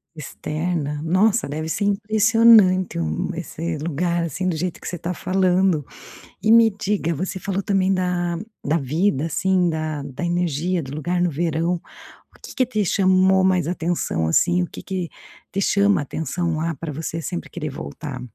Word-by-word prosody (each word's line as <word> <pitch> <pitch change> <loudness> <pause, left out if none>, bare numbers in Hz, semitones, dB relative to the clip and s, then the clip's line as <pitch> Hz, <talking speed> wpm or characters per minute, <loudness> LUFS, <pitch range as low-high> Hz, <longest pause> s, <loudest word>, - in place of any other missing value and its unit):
Externa, 155 0 -3
nossa 195 +6 +2
deve 155 +2 -3
ser 200 +5 -1
impressionante 210 - +4
um 80 -1 -2
esse 165 -1 -4
lugar, 170 +2 -1
assim, 170 +4 -3
do 175 - 0
jeito 175 +2 -3
que - - -9
você 180 - -4
tá 175 +2 -3
falando. 185 -3 +1 0.6
E 220 - +4
me 230 -1 +7
diga, 195 -5 -1
você 185 +4 -3
falou 195 +1 -2
também 195 -1 +1
da 180 -2 0 0.3
da 150 +3 +1
vida, 155 +2 0
assim, 180 +2 +1
da 155 -2 -3
da 140 +4 -6
energia 175 0 0
do 135 0 -7
lugar 175 +4 -1
no 175 - +2
verão, 165 +2 -1 0.6
o - - -28
que - - -10
que 255 - +2
te 215 -4 -1
chamou 190 0 +3
mais 185 -4 +2
atenção, 165 - -1
assim, 175 - +3
o - - -1
que - - -10
que 185 -3 -3 0.4
te 195 0 -1
chama 200 -5 +3
atenção 165 +3 -2
lá, 165 +1 -1
pra 155 +1 -5
você 160 +2 -4
sempre 175 +2 -5
querer 155 -4 -5
voltar? 140 -1 -7
175 Hz, 170 wpm, -22 LUFS, 155-190 Hz, 0.6 s, me